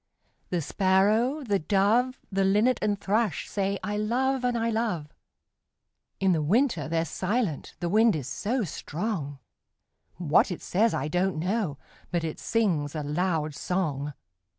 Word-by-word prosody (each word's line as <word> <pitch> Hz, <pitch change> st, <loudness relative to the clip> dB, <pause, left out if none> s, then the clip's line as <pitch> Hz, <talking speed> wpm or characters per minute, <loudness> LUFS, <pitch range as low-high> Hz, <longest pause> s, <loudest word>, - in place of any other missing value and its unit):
The 175 Hz, -3 st, -1 dB
Sparrow, 210 Hz, -, +2 dB
the 205 Hz, -5 st, +1 dB
Dove, 215 Hz, +9 st, +2 dB
The 195 Hz, 0 st, +1 dB
Linnet 210 Hz, +6 st, +3 dB
and 205 Hz, -2 st, 0 dB
Thrush 210 Hz, 0 st, 0 dB
say, 200 Hz, 0 st, -1 dB
'I 210 Hz, 0 st, -2 dB
love 255 Hz, +5 st, 0 dB
and 245 Hz, -1 st, +1 dB
I 230 Hz, 0 st, 0 dB
love!' 215 Hz, -10 st, -2 dB, 1.1 s
In 195 Hz, -1 st, +3 dB
the 165 Hz, -3 st, +2 dB
winter 190 Hz, -, +2 dB
they're 165 Hz, 0 st, +1 dB
silent 190 Hz, -, -2 dB
the 175 Hz, -, 0 dB
wind 220 Hz, +2 st, +4 dB
is 140 Hz, -5 st, -4 dB
so 225 Hz, -, -1 dB
strong; 160 Hz, -3 st, -4 dB, 0.8 s
What 165 Hz, -2 st, +3 dB
it 180 Hz, -, -5 dB
says, 220 Hz, +5 st, +2 dB
I -, -, -1 dB
don't 180 Hz, +2 st, 0 dB
know, 180 Hz, -3 st, -1 dB, 0.3 s
but 170 Hz, -2 st, -1 dB
it 160 Hz, -1 st, -4 dB
sings 170 Hz, -10 st, 0 dB
a 155 Hz, -, -2 dB
loud 155 Hz, 0 st, -1 dB
song. 150 Hz, -5 st, -2 dB
195 Hz, 150 wpm, -27 LUFS, 160-225 Hz, 1.1 s, wind